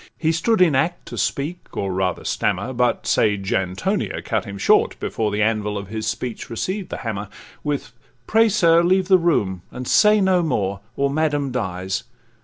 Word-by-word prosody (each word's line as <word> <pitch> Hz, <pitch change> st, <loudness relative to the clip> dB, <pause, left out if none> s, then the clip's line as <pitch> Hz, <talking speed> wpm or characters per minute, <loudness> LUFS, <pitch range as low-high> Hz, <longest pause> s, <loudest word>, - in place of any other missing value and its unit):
He 160 Hz, -1 st, +1 dB
stood 180 Hz, +6 st, +1 dB
in 170 Hz, -5 st, +5 dB
act 165 Hz, +6 st, 0 dB
to -, -, -7 dB
speak, 155 Hz, +6 st, -3 dB
or 95 Hz, -1 st, -1 dB
rather 90 Hz, -1 st, -1 dB
stammer, 130 Hz, -, -1 dB
But 125 Hz, 0 st, 0 dB
sage 100 Hz, -3 st, +1 dB
Antonia 95 Hz, 0 st, -1 dB
cut -, -, -1 dB
him 100 Hz, 0 st, -7 dB
short 100 Hz, -, +3 dB
before 110 Hz, -2 st, -1 dB
The 105 Hz, +1 st, 0 dB
anvil 105 Hz, -1 st, 0 dB
of 100 Hz, -1 st, -7 dB
his 110 Hz, 0 st, -4 dB
speech 115 Hz, +1 st, -4 dB
received 185 Hz, -, -3 dB
the -, -, -4 dB
hammer, 105 Hz, -2 st, -3 dB, 0.3 s
With 145 Hz, -4 st, -3 dB, 0.3 s
'Pray, 225 Hz, +1 st, +4 dB
sir, 170 Hz, -5 st, +4 dB
leave 185 Hz, +2 st, +2 dB
the 185 Hz, -1 st, +6 dB
room, 100 Hz, -, +1 dB
and 125 Hz, 0 st, -7 dB
say 210 Hz, 0 st, +5 dB
no 190 Hz, -2 st, +3 dB
more, 100 Hz, -, -1 dB, 0.2 s
Or 140 Hz, 0 st, 0 dB
madam 145 Hz, -2 st, 0 dB
dies. 95 Hz, -6 st, -3 dB
125 Hz, 180 wpm, -21 LUFS, 100-170 Hz, 0.3 s, the